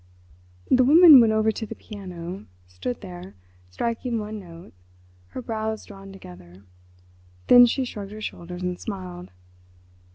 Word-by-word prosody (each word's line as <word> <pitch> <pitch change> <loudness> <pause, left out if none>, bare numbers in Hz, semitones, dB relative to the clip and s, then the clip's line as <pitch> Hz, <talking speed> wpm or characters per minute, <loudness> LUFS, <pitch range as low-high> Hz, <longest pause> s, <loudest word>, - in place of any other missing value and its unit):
The 255 - +5
woman 305 0 +9
went 225 -2 +3
over 220 0 +2
to 220 +1 -6
the - - -8
piano—stood 170 - -8
there—striking 175 - -6
one 215 0 -5
note—her 90 - -14
brows 220 -1 -4
drawn 195 -1 -12
together. 90 - -14 0.8
Then 245 0 +8
she 260 +2 -1
shrugged 205 -5 -8
her 215 +1 -10
shoulders 180 -3 -7
and 180 -1 -3
smiled. 185 -4 -7
190 Hz, 120 wpm, -24 LUFS, -, 0.8 s, woman